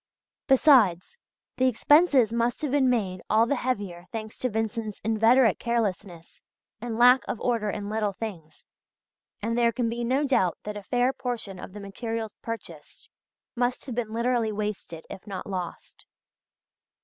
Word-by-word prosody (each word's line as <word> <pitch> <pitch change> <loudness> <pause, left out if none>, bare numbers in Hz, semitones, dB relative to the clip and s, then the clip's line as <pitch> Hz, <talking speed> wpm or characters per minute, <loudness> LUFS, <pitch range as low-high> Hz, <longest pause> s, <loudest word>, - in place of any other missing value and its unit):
Besides, 265 - +4 0.4
the 260 0 +3
expenses 265 -1 +4
must 235 +4 0
have 290 - -1
been 270 -2 +3
made 195 -7 -1
all 225 +1 +4
the 245 - 0
heavier 200 -9 -3
thanks 220 -1 -6
to 255 - 0
Vincent's 220 -1 -3
inveterate 225 +1 +4
carelessness 200 -7 -3 0.4
and 235 -1 -4
lack 250 +2 +7
of 230 - -3
order 230 -4 0
in 205 0 -4
little 210 -1 -1
things, 180 -8 -8 0.8
and 230 +2 -1
there 235 -1 +3
can 235 0 -1
be 235 +1 -3
no 260 +5 +1
doubt 190 -10 +2
that 210 0 -5
a 205 - -6
fair 245 +6 +1
portion 230 -8 -5
of 185 - -9
the 210 - -8
materials 220 +2 -5
purchased 180 -9 -8 0.4
must 245 +1 -1
have 260 - -5
been 230 -2 -3
literally 235 -1 0
wasted, 205 -6 -5
if 195 - -10
not 195 -2 -5
lost. 185 -3 -7
225 Hz, 155 wpm, -26 LUFS, 205-245 Hz, 0.8 s, lack